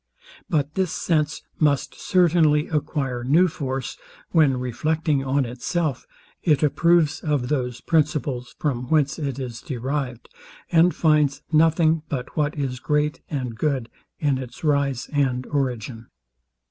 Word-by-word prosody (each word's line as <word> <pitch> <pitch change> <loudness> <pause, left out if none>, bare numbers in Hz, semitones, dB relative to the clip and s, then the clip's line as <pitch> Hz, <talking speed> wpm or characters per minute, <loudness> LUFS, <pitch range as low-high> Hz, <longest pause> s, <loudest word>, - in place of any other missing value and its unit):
But 150 -2 0
this 190 -3 0
sense 155 -4 0 0.2
must 145 -3 +2
certainly 165 -4 +3
acquire 140 -5 -2
new 160 +9 +4
force, 135 -5 -4 0.3
when 150 -6 +4
reflecting 150 +4 0
on 135 0 +1
itself, 130 +4 -2 0.3
it 155 -3 +2
approves 160 +1 +3
of 145 -5 -1
those 125 -4 -2
principles, 145 -5 0
from 125 -5 -2
whence 150 -1 +2
it 140 -4 -3
is 125 -4 -6
derived, 130 -3 -4 0.4
and 170 +1 +4
finds 150 -3 +2
nothing 160 0 +4
but 130 -4 -4
what 150 0 0
is 130 -3 -2
great 150 +3 0
and 130 -6 -3
good 130 -2 -1 0.3
in 140 -4 0
its 130 +3 -9
rise 140 -4 +1
and 130 -3 +1
origin. 125 -5 -3
145 Hz, 130 wpm, -23 LUFS, 130-155 Hz, 0.4 s, new